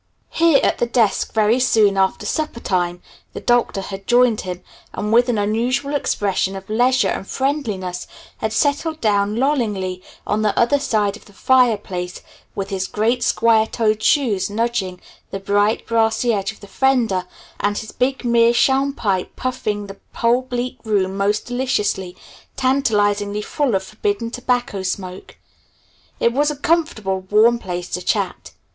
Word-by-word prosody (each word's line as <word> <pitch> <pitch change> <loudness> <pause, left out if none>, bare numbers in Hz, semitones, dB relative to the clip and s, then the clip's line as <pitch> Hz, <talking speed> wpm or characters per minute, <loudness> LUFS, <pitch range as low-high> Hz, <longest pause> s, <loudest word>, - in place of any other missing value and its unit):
Here 330 -4 +4
at - - +1
the 240 - +1
desk 235 -3 +1
very 220 +3 +2
soon 220 -5 +3
after 195 +2 +1
supper 305 0 -2
time 175 -4 -1 0.3
the - - -5
Doctor 240 -4 +1
had 195 0 -8
joined 245 -2 +4
him, 180 -1 -6 0.3
and 210 +1 -2
with 240 +2 +4
an 235 - +1
unusual 235 +7 0
expression 195 -8 0
of 190 0 -8
leisure 250 +3 +3
and 195 - -4
friendliness 210 -11 -2 0.3
had 220 - -2
settled 295 +6 0
down 205 -3 +1
lollingly 215 -9 -1 0.2
on 210 - 0
the 215 -1 0
other 280 +5 +3
side 210 -7 0
of - - -15
the 205 - -18
fireplace 205 -8 +1 0.3
with 195 0 -4
his 190 -1 -2
great 230 +4 0
square 225 -1 +3
toed 215 -2 0
shoes 225 -9 +2
nudging 210 -4 -2 0.3
the 195 - -5
bright, 205 +3 +1
brassy 230 +1 +1
edge 200 0 -1
of 220 - -18
the 200 - -11
fender, 235 -8 +1 0.3
and 205 0 0
his 220 - -6
big 260 0 -1
meerschaum 240 +4 +3
pipe 195 -7 -2
puffing 215 -5 -3
the 195 0 -10 0.2
whole 235 +2 +2
bleak 250 -1 -4
room 195 -4 0
most 200 +1 0
deliciously, 210 -7 -1 0.4
tantalizingly 210 -6 +1
full 275 -4 0
of 190 - 0
forbidden 210 +2 -3
tobacco 245 -4 -1
smoke. 185 0 -5 0.8
It 235 - +2
was 290 +3 +2
a 300 - -3
comfortable, 280 - 0
warm 230 +3 +4
place 180 -3 -5
to 180 - -3
chat. - - -2
220 Hz, 155 wpm, -20 LUFS, 200-250 Hz, 0.8 s, Here